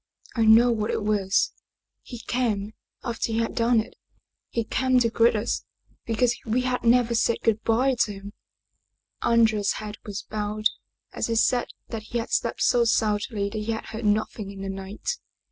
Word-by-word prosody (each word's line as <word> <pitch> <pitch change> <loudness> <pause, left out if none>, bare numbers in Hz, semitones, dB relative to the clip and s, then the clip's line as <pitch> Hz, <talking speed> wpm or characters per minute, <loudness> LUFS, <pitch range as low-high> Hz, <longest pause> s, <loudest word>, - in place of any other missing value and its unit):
I 225 -2 +2
know 230 +3 +7
what 215 -2 -1
it - - -1
was. 205 -2 +1 0.5
He 240 -3 -9
came 215 -4 -1 0.3
after 235 -2 -2
he 225 - -1
had 230 0 0
done 230 0 +3
it 220 - -4 0.6
he 230 - -1
came 255 +3 +2
to 230 -2 +2
greet 230 0 +4
us 215 +2 -1 0.4
because 235 +1 +2
we 235 +3 0
had 250 0 -1
never 240 0 +4
said 235 0 +2
good 220 -1 +2
by 250 +4 +2
to 235 -3 +1
him/' 200 +1 -9 0.9
Andrea's 220 -3 +3
head 210 0 -6
was 205 -1 -6
bowed 215 0 -4 0.5
as - - -2
he 230 - -1
said 245 +2 +2 0.2
that 225 -2 -4
he 225 +3 -4
had 230 - -4
slept - - 0
so 240 - +4
soundly 210 -2 +1
that 215 - -3
he 220 +2 -2
had 220 - -5
heard 225 0 -6
nothing 210 0 0
in 195 -1 -8
the 195 - -4
night. 195 - -4
225 Hz, 180 wpm, -25 LUFS, 210-235 Hz, 0.9 s, know